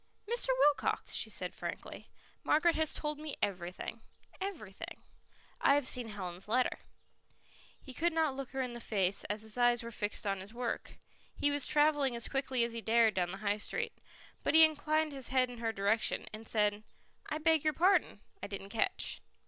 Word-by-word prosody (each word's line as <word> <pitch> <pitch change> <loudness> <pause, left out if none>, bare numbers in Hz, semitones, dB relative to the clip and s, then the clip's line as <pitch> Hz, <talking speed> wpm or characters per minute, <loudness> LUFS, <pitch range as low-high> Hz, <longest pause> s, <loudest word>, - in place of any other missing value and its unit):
"Mr. 475 +3 +1
Wilcox," 295 - +2
she - - +3
said - - -4
frankly. - - -7 0.3
"Margaret 330 +2 +4
has 315 -1 0
told 300 -1 -3
me 305 -2 -4
everything 185 +4 -3 0.4
everything. 305 - -6 0.6
I 280 - +5
have 285 -3 +1
seen 245 -2 +2
Helen's 185 -4 -6
letter." 250 +3 +1 1.0
He 260 - -10
could 340 +6 +1
not 315 -4 +1
look 270 -1 -5
her 265 0 -2
in 250 -1 -5
the 240 - -6
face, 195 -3 0
as 210 +1 -2
his 220 +2 -2
eyes 240 0 +4
were 235 - -6
fixed 210 -1 -2
on 195 -1 0
his 200 +5 -9
work; 240 -1 -4 0.4
he 290 - +1
was 285 -3 -1
travelling 295 -4 +3
as 235 - +3
quickly 265 -3 0
as 235 0 -2
he 230 - -4
dared 225 -1 +4
down 180 -2 0
the 190 - -5
High 205 +1 +2
Street. - - -3 0.5
But - - +1
he 320 0 +10
inclined 310 0 0
his 270 -3 -3
head 255 -1 +2
in 240 - -9
her 225 -1 -1
direction, 205 +1 +1
and 220 +1 -8
said, 210 -1 +1 0.5
"I 305 - -2
beg 315 -1 +3
your 310 -1 +2
pardon; 365 +7 +2 0.2
I - - -4
didn't 200 -1 -7
catch." 220 +1 0
245 Hz, 190 wpm, -33 LUFS, 210-295 Hz, 1.0 s, he